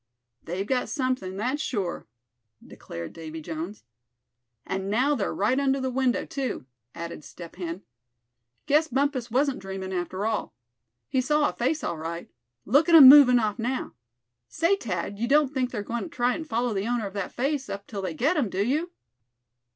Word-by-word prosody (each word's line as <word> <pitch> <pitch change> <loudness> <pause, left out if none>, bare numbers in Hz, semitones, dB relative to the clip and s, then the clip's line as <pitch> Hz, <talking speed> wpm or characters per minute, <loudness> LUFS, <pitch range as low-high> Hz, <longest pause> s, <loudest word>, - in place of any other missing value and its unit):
"They've 180 +4 -3
got 250 +3 -1
something, 255 -9 -2
that's 255 +8 -1
sure," 200 - -3 0.6
declared 85 0 -8
Davy 160 -1 -7
Jones. 165 +5 -6 0.8
"And 190 0 -3
now 255 +8 +2
they're 220 -9 -1
right 225 +7 +1
under 275 -1 +1
the 260 -1 -2
window, 255 -1 +1
too." 265 - -4 0.3
added 170 -2 -7
Step 170 +2 -11
Hen. 175 +1 -5 0.8
"Guess 305 +3 +3
Bumpus 265 -3 0
wasn't 270 +3 +1
dreamin' 190 0 -6
after 185 +2 -3
all. 220 -1 -2 0.5
He 260 - +1
saw 300 +3 +2
a - - -6
face, 285 +5 -1
all 170 - -2
right. 165 +2 -6 0.3
Look 285 - +3
at 335 - +7
'em 275 -5 +12
movin' 270 -3 +9
off 215 -1 0
now. 250 +3 -2 0.5
Say, 335 +5 +2
Thad, 200 - -4
you 235 - 0
don't 290 +1 +3
think 255 -2 0
they're 215 -5 -4
goin' 235 +3 -3
to - - -8
try 250 -3 +1
and 315 +2 -6
follow 235 -1 0
the 195 +2 -2
owner 240 -2 0
of 195 - -6
that 200 -2 -4
face 275 +2 -2
up 200 0 -5
till 205 -3 -6
they 180 -4 -4
get 355 - +1
him, 255 -9 +1
do 195 +2 -1
you?" 305 +8 0
240 Hz, 180 wpm, -26 LUFS, 190-275 Hz, 0.8 s, em